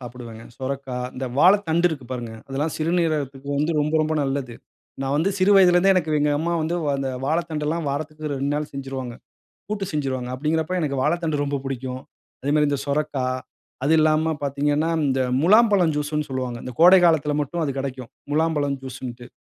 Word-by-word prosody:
சாப்பிடுவேங்க. 120 -2 -9 0.2
சொரைக்கா 135 -1 -4 0.2
இந்த 130 +1 -4
வாழைத்தண்டு 175 -1 +4
இருக்கு 145 -6 -6
பாருங்க. 120 -3 -5 0.2
அதெல்லாம் 145 +4 -2
சிறுநீரகத்துக்கு 155 -5 -1
வந்து 155 +3 +1
ரொம்ப 150 +2 -1
ரொம்ப 155 0 -1
நல்லது. 135 -3 -3 0.5
நான் 135 +1 -1
வந்து 175 +6 +2
சிறு 190 +2 +3
வயதிலருந்தே, 185 0 +6
எனக்கு 160 -4 0
எங்க 150 0 +2
அம்மா 170 +3 -1
வந்து 165 +2 -1 0.2
அந்த 135 -1 -2 0.2
வாழைத்தண்டுலாம் 160 0 -1
வாரத்துக்கு 155 +1 -4
2 140 +1 -2
நாள் 150 0 -3
செஞ்சிருவாங்க. 135 -3 -5 0.6
கூட்டு 200 -2 -2
செஞ்சுருவாங்க. 130 -4 -2
அப்படிங்கறப்ப 160 +5 -1
எனக்கு 140 -3 -1
வாழைத்தண்டு 155 -2 0
ரொம்ப 140 0 -1
புடிக்கும். 130 -1 -4 0.4
அதே 140 - -1
மாரி 150 -1 +3
இந்த 140 -1 -1
சுரைக்கா. 140 -2 -1 0.6
அது 155 +3 +3
இல்லாம 155 +1 +3
பார்த்தீங்கன்னா, 145 +3 0 0.2
இந்த 135 -1 +1 0.2
முலாம்பழம் 200 -4 +5
ஜூஸுன்னு 150 0 -2
சொல்லுவாங்க. 130 -2 -3
இந்த 125 - -6
கோடை 180 +2 +8
காலத்தில 150 -3 +3
மட்டும் 165 +4 -3
அது 140 - -1
கெடைக்கும். 130 -2 -5 0.2
முலாம்பழம் 150 -3 +1
ஜூஸுன்ட்டு. 125 -1 -7
150 Hz, 160 wpm, -23 LUFS, 135-160 Hz, 0.6 s, கோடை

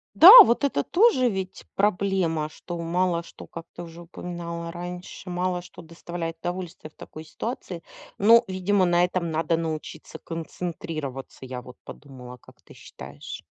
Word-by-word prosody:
Да, 355 +4 +11
вот 240 -1 0
это 265 - +1
тоже 345 - +3
ведь 190 -3 -5
проблема, 190 -6 0
что 175 +3 -8
мало 170 +1 0
что, - - -13
как 165 -1 -9
ты 175 - -7
уже 170 0 -11
упоминала 170 -1 -7
раньше, 180 +1 -8
мало 180 0 -2
что 180 0 -13
доставляет 165 0 -7
удовольствие 175 -3 -6
в - - -36
такой 155 - -11
ситуации. 180 0 -6 0.3
Но, 230 +4 +6
видимо, 190 +1 +1
на 175 0 +3
этом 180 -1 -3
надо 165 +1 0
научиться 160 -1 -6
концентрироваться, 160 -5 -6
я 125 -1 -6
вот 125 0 -14
подумала. 125 -3 -11
Как - - -19
ты - - -16
считаешь? 70 +2 -10
175 Hz, 150 wpm, -25 LUFS, 160-185 Hz, 0.3 s, Да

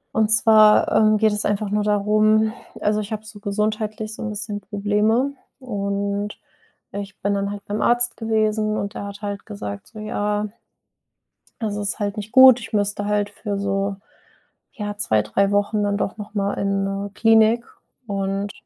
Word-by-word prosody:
Und 220 -1 +2
zwar, 215 -1 +6
ähm, 215 0 +4
geht 220 0 +3
es 210 0 -2
einfach 205 0 -1
nur 210 +1 0
darum 215 +1 +3 0.3
also, 210 0 +1
ich 210 +1 -5
habe 215 0 -5
so 215 -1 -11
gesundheitlich 215 +1 -2
so - - -9
'n 220 - -3
bisschen 210 0 -4
Probleme. 210 +6 0 0.3
Und 200 -3 -3 0.5
ich 200 -1 -7
bin 200 +1 0
dann 200 0 -1
halt 205 -1 -7
beim 205 +1 -3
Arzt 240 0 +2
gewesen 215 -1 0
und 200 0 -3
der - - -6
hat 200 +1 -9
halt 205 -1 -5
gesagt 100 0 -7
so: 220 - -12
„Ja" 210 0 -2 1.1
„also 210 -2 -2
ist 205 +3 -3
halt 205 0 -2
nicht 210 +1 -6
gut. 260 -2 +8
Ich 220 - -10
müsste 205 0 0
halt 205 0 0
für 205 -1 -5
so, 195 0 -1 0.8
ja, 205 -1 -5
2, 110 - +2
3 195 - +1
Wochen 205 +1 +1
dann 200 0 0
doch 195 - -3
noch 210 -1 -9
mal 200 -1 -1
in 195 0 -1
'ne 195 +1 -3
Klinik." 225 +2 +4 0.4
Und 195 0 -2
210 Hz, 175 wpm, -22 LUFS, 200-215 Hz, 1.1 s, gut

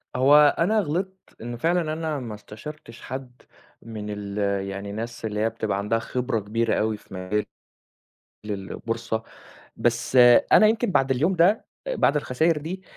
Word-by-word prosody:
هو 145 +3 +6
أنا 215 +6 +3
غلِطت 190 +2 -4
إن 120 +1 -5
فعلًا 165 +3 0
أنا 155 -2 -3
ما 115 -4 -6
استشَرتش 115 +4 -11
حد، 130 -1 -8 0.4
من 110 -2 -7
ال 100 -1 -6 0.3
يعني 100 +1 -6
الناس 115 +2 -6
اللي 105 -1 -3
هي 110 - +2
بتبقى 105 -3 -2
عندها 105 +3 0
خبرة 125 0 -2
كبيرة 110 +3 -1
أوي 110 0 0
في 105 - -17
مجال 95 +3 -2 1.0
للبورصة، 110 +3 -4 0.5
بس 120 +2 0 0.4
أنا 215 - +8
يمكن 225 +1 +1
بَعد 135 -7 +2
اليوم 150 +9 +2
ده، 180 +6 +3 0.2
بَعد - - +2
الخساير 150 +3 +1
دي، 175 +6 -6
120 Hz, 150 wpm, -24 LUFS, 110-155 Hz, 1.0 s, أنا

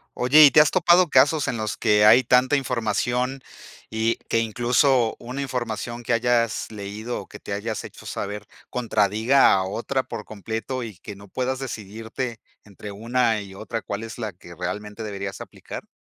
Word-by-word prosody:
Oye, 140 +5 +6
¿y 140 - +7
te 150 - +7
has 150 - +3
topado 175 0 +4
casos 145 +3 +4
en 120 - -1
los 110 -1 -3
que 105 0 +3
hay 125 +4 +7
tanta 125 +3 +4
información 125 +1 -1 0.5
y, 110 +1 0
que 115 - +2
incluso 120 +2 +2
una 125 +4 -6
información 120 -3 -4
que 120 - 0
hayas 115 -1 +1
leído 105 +3 -5
o - - -13
que - - -11
te 100 - -6
hayas 105 +2 -3
hecho - - -12
saber, 105 +1 -5 0.2
contradiga 110 +2 +3
a 95 - +2
otra 120 +7 -2
por 115 -4 -7
completo 110 +5 -5
y 110 -6 -8
que 100 +4 -9
no 100 +1 -14
puedas 130 +5 -2
decidirte 115 0 -5 0.2
entre 105 0 -10
una 115 +1 0
y 100 -1 -10
otra 110 +3 -5
cuál 100 +2 -5
es 115 -1 -8
la 110 -4 -4
que 85 0 -14
realmente 105 +3 -5
deberías 100 -2 -5
aplicar? - - -9
115 Hz, 175 wpm, -24 LUFS, 105-125 Hz, 0.5 s, y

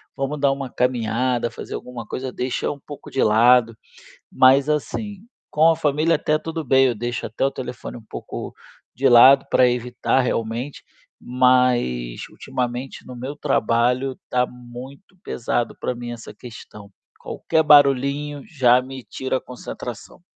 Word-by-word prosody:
vamos 140 +1 -3
dar 140 -1 +3
uma 135 -1 -6
caminhada, 120 0 0
fazer - - -9
alguma 125 -2 -8
coisa, 130 +4 -5
deixa 125 0 -2
um 145 - -8
pouco 145 +1 -11
de 135 - 0
lado." 115 +1 +4 0.6
Mas 135 +3 +5
assim, 200 +7 -3 0.3
com 155 +2 +4
a - - +1
família 155 +1 +1
até 150 0 0
tudo 160 +1 -5
bem, 135 -1 +4
eu 125 -2 +1
deixo 120 +2 -4
até 110 - -4
o 135 - +2
telefone 125 -2 -7
um 115 - -15
pouco - - -7 0.4
de 135 +1 +2
lado 130 +3 +7
pra 125 - +4
evitar, 125 +2 0
realmente, 120 +3 -3 0.4
mas, 125 - +1
ultimamente, 125 +1 -5
no 125 - -9
meu 130 +4 -6
trabalho 125 -1 0
tá 125 0 +2
muito 125 +9 -12
pesado 120 0 -2
pra - - -3
mim 120 0 -7
essa 115 -2 -9
questão. 105 -2 -12 0.3
Qualquer 160 - -1
barulhinho 145 0 +3
já 125 -4 +3
me 130 0 -9
tira 130 +2 -3
a - - -8
concentração. 125 -1 -9
125 Hz, 150 wpm, -22 LUFS, 120-140 Hz, 0.6 s, lado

